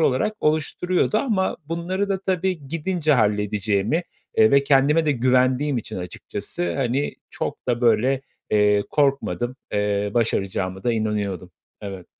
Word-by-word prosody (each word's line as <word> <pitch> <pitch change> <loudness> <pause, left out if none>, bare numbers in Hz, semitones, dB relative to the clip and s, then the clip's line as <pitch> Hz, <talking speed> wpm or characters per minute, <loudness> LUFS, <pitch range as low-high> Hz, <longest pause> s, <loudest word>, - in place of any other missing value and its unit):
olarak 140 +7 +2
oluşturuyordu 175 +6 +1
ama 210 -8 0
bunları 180 +5 -2
da 190 -1 -1
tabii 185 -5 -1
gidince 165 0 0
halledeceğimi, 105 - +1 0.3
eee, 110 - +6
ve 140 0 +5
kendime 145 +3 +3
de 150 - +3
güvendiğim 130 +2 +2
için 115 - -5
açıkçası, 90 -1 -4
hani, 135 +2 -1 0.2
çok - - -5
da 120 0 +1
böyle, 120 +3 +3 0.3
eee, 105 -1 +4
korkmadım. 135 -3 0 0.2
Eee, 105 0 0
başaracağıma 95 -4 -1
da 120 - +2
inanıyordum. 105 -5 -2 0.3
Evet. 95 -3 -7
130 Hz, 130 wpm, -23 LUFS, 105-155 Hz, 0.3 s, eee